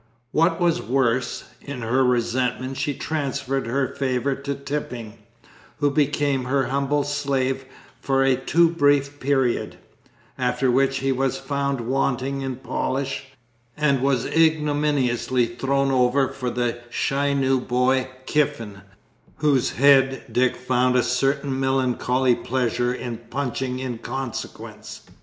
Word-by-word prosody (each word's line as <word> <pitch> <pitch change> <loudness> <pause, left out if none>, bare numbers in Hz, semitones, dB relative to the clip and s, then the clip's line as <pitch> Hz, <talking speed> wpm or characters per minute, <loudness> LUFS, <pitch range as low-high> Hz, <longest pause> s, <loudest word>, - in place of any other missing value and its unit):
What 165 +4 +2
was 175 -1 +2
worse, 125 -1 0 0.2
in 140 -4 -6
her 125 +4 +2
resentment 125 +1 0
she 145 - -1
transferred 135 -4 -2
her 135 +3 0
favour 135 0 0
to 140 +1 -4
Tipping, 125 -6 -5 0.6
who 145 -1 +2
became 145 -2 +1
her 135 +1 0
humble 140 +2 +1
slave 135 -2 -1 0.4
for 135 -1 +2
a 135 -1 +4
too 160 +6 +3
brief 145 -2 +2
period; 135 -3 0 0.6
after 125 +1 +1
which 135 +2 +2
he 135 0 +1
was 135 0 0
found 140 -2 -2
wanting 135 +2 -1
in 135 -1 -3
polish, 135 +1 -3 0.5
and 140 -3 +2
was 135 -3 +1
ignominiously 145 -6 +2
thrown 135 +3 0
over 130 +1 +3
for 125 -2 -4
the 120 -1 -1
shy 140 +3 0
new 135 -1 +2
boy 130 +1 +1 0.2
Kiffin, 115 -10 -1 0.5
whose 140 -5 +2
head 135 -1 +4
Dick 125 0 +2
found 125 0 +1
a 125 - +4
certain 135 +1 0
melancholy 130 -1 +1
pleasure 120 0 -1
in 125 -2 -4
punching 130 -1 -2
in 125 -3 -4
consequence. 135 -2 -6
135 Hz, 125 wpm, -23 LUFS, 125-140 Hz, 0.6 s, a